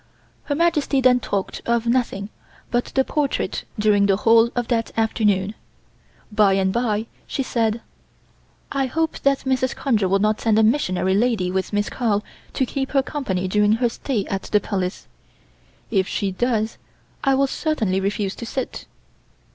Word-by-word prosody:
Her 285 - -1
Majesty 300 -4 +2
then 255 -1 +5
talked 200 -4 -3
of 235 0 +1
nothing 235 -5 0 0.4
but 240 0 +1
the 265 - +1
portrait 290 0 -1
during 210 -1 +3
the 195 - +4
whole 225 +2 +5
of 245 -2 -1
that 230 -2 0
afternoon. 210 -3 +1 0.8
By 210 -2 +4
and 190 0 +1
bye 225 -2 0 0.2
she 270 - -2
said: 230 -2 0 0.9
"I 270 -1 0
hope 320 +4 -1
that 275 -1 +2
Mrs. 260 -1 0
Conger 220 -8 +1
will 195 - +4
not 215 +2 +1
send 220 -2 +2
a 220 - +5
missionary 190 -6 +2
lady 210 -4 +1
with 190 0 -2
Miss 205 0 0
Carl 210 -4 0 0.3
to 260 - +1
keep 270 +2 -4
her 275 -1 +3
company 190 -12 -2
during 210 +2 +3
her 240 +2 +2
stay 230 -4 -2
at 195 0 -3
the 210 - +1
Palace. 190 -2 -3 0.9
If 190 -3 +2
she 200 -1 -1
does 220 +1 -1 0.4
I 270 -1 +3
will 275 +1 +3
certainly 230 - -1
refuse 200 0 -1
to 235 - -6
sit." 260 +1 -4
225 Hz, 165 wpm, -22 LUFS, 200-260 Hz, 0.9 s, then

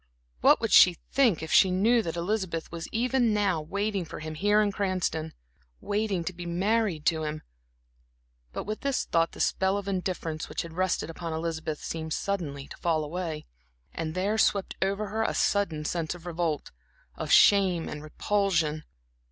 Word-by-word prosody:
What - - +5
would - - -2
she 180 -2 +7
think 240 - +3
if 160 - -6
she 190 - +6
knew 220 +6 +3
that 165 -6 -4
Elizabeth 175 -2 -2
was 170 -1 -6
even 240 -1 +1
now 195 -6 +1
waiting 200 +4 -2
for 160 - -8
him 155 0 -6
here 205 +6 +2
in 210 -1 +2
Cranston 185 -5 -1 0.5
waiting 205 -4 -1
to 185 - -4
be 175 0 -7
married 190 -2 0
to 160 -2 +2
him? 155 0 -4 1.1
But - - -4
with 215 +1 -4
this 275 -2 0
thought 165 0 +1
the - - -11
spell 190 +1 +1
of 200 -1 -5
indifference 180 -4 -3
which - - -3
had 165 -1 -9
rested 180 -2 -1
upon 165 0 -5
Elizabeth 160 -1 -3
seemed 160 -1 -4
suddenly 150 -8 -3
to - - -10
fall 160 -2 0
away, 160 -1 -4 0.5
and 160 0 -4
there 200 +4 0
swept 200 -3 +1
over 200 +2 -1
her 220 +2 -2
a 225 - 0
sudden 170 -7 +1
sense 170 +1 -2
of 175 0 -13
revolt, 165 -3 -2 0.4
of - - -4
shame 190 -5 +5
and 150 - -6
repulsion. 160 -2 0
180 Hz, 175 wpm, -28 LUFS, 160-200 Hz, 1.1 s, she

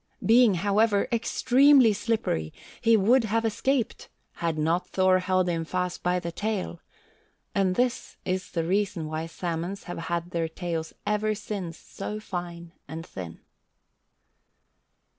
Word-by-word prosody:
Being, 230 -3 +6
however, 205 +3 +2
extremely 255 +1 +5
slippery, 205 - -1 0.3
he 230 -1 +5
would 230 +5 +4
have 225 +2 0
escaped 240 +2 -1 0.3
had 165 -2 -1
not 165 +4 +1
Thor 185 -1 +3
held 185 0 +1
him 165 -2 0
fast 180 +2 -2
by 180 0 +1
the 170 -1 -5
tail, 195 -2 -3 0.7
and 190 -2 +2
this 250 +2 -1
is 185 0 -2
the 165 - -1
reason 190 -1 0
why 155 +1 -3
salmons 170 +3 -4
have 175 - -6
had 170 +1 -3
their 165 -2 0
tails 165 -1 -4
ever 210 0 +1
since 195 -5 -5
so 210 +2 -6
fine 175 -4 -6 0.2
and 160 +3 -7
thin. 85 -3 -8
185 Hz, 135 wpm, -27 LUFS, 170-215 Hz, 0.7 s, Being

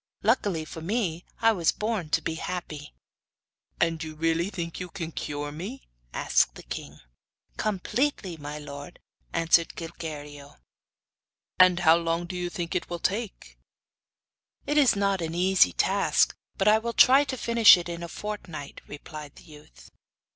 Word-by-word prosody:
Luckily 200 -7 +1
for 160 - -9
me 180 -2 -2 0.2
I 225 0 +6
was 175 -7 +2
born 210 -7 -3
to 165 0 +1
be 165 - -2
happy.' 160 -3 -6 0.9
'And 165 -1 +1
you 155 -1 -7
really 165 +3 0
think 170 -4 -5
you 180 -1 -5
can 165 -2 -6
cure 145 -1 -4
me?' 195 - -7 0.3
asked - - +1
the - - -11
king. - - -7 0.6
'Completely, 215 - -1
my 150 -1 -7
lord,' 145 +2 -9 0.3
answered 165 0 +2
Gilguerillo. 150 -4 -8 1.0
'And 185 -1 +6
how 165 -1 +6
long 165 0 -1
do 180 - -7
you 180 0 -2
think 175 -1 -4
it 180 - -2
will 175 - -3
take?' 205 +5 -4 1.1
'It 295 - -1
is 275 -7 +5
not 200 -2 +1
an 165 0 -3
easy 180 - +4
task; - - +2 0.2
but 195 - +1
I 215 +1 +6
will 235 +1 -4
try 270 +4 +7
to 265 -2 -4
finish 230 -4 +7
it 175 - -5
in 170 0 -5
a 170 - -5
fortnight,' 170 -7 -7
replied 150 0 -9
the - - -15
youth. 150 - -16
170 Hz, 155 wpm, -27 LUFS, 160-200 Hz, 1.1 s, try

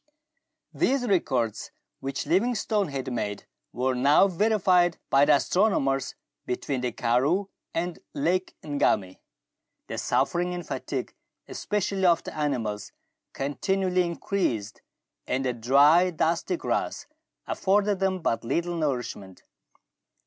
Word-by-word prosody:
These 265 -1 +1
records 125 - 0 0.3
which 135 0 -4
Livingstone 210 0 +1
had 135 -2 -4
made 105 -3 -3 0.3
were 130 +2 0
now 140 +9 +5
verified 185 -3 +2
by 140 +1 +6
the - - +6
astronomers 135 -4 +1 0.3
between 130 +1 -2
the 125 -1 -1
karroo 135 - +1 0.2
and 170 +1 -3 0.2
Lake 175 +6 0
Ngami. 105 -10 0 0.7
The - - -5
suffering 180 +1 0
and 175 - -6
fatigue, - - -4 0.3
especially 195 -2 -1
of 170 -1 +3
the - - -8
animals, 120 -9 -2 0.4
continually 180 +7 0
increased, 170 - -2 0.5
and 130 +1 -1
the 125 - 0
dry 140 +9 +5
dusty 170 - 0
grass - - -2 0.4
afforded 200 0 +1
them 190 -2 0
but 115 - 0
little 170 +8 -1
nourishment. 125 - -3
165 Hz, 110 wpm, -26 LUFS, 130-185 Hz, 0.7 s, by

